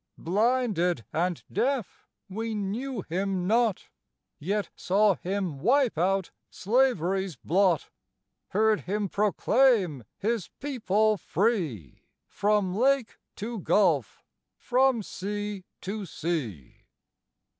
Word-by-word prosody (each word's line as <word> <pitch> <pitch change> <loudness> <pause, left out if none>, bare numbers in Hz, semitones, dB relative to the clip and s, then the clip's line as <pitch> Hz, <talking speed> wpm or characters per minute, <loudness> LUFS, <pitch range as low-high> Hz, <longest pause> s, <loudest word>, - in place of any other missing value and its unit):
Blinded 195 - +1
and 175 +2 -1
deaf, 245 +2 -1 0.2
we 220 +3 -4
knew 210 +3 -3
him 185 +1 -2
not; 225 0 +1 0.5
Yet 200 +6 -2
saw 205 +2 +3
him 185 -5 -3
wipe 250 - +3
out 190 +3 0 0.2
slavery's 195 - +1
blot; 180 -2 +1 0.6
Heard 215 +1 +2
him 205 0 -1
proclaim 210 - +2
his 225 -3 -1
people 215 -6 +1
free, 170 - -1 0.2
From 205 -3 +1
lake 260 0 +1 0.2
to 225 +2 -5
gulf, 165 - +1 0.3
from 255 -2 +2
sea 205 0 -5 0.2
to 200 +1 -5
sea. 130 - -4
200 Hz, 95 wpm, -27 LUFS, 180-225 Hz, 0.6 s, saw